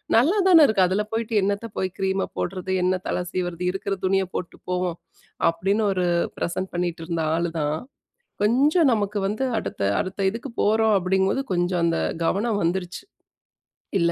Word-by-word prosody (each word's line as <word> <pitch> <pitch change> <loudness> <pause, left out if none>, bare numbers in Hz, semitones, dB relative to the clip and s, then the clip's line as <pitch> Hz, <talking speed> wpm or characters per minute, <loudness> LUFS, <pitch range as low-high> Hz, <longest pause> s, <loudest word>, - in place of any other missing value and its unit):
"நல்லா 305 - +4
தான 335 -4 +8
இருக்கு. 205 -4 +3
அதில 195 +3 0
போய்ட்டு 225 0 -2
என்னத்த 200 +3 -1
போய் 190 - 0
கிரீம்ம 190 0 0
போடுறது, 185 0 -3
என்ன 185 0 +1
தலை 180 - -1
சீவுறது, 175 -1 -3
இருக்கிற 195 +1 -2
துணியை 190 0 +2
போட்டுட்டு 180 - -5
போவோம்." 180 -1 -1 0.5
அப்படின்னு 195 +6 0
ஒரு 180 -1 0 0.3
பிரசன்ட் 185 +2 -2
பண்ணிட்டு 175 -2 -2
இருந்த 165 -1 -2
ஆளு 170 0 -1
தான். 150 0 0 0.7
கொஞ்சம் 280 +7 +4
நமக்கு 205 -1 -1
வந்து, 215 +6 -2 0.2
"அடுத்த - - -5 0.2
அடுத்த 190 +1 -2
இதுக்கு 235 +3 -7
போறோம்." 220 +1 +3
அப்படிங்கும் 190 +1 +1
போது, 270 - -2
கொஞ்சம் 175 0 0
அந்த 165 0 +1 0.3
கவனம் 205 +3 0
வந்துருச்சு. 180 +1 -2 1.0
இல்ல 170 0 +3
190 Hz, 155 wpm, -24 LUFS, 180-215 Hz, 1.0 s, தான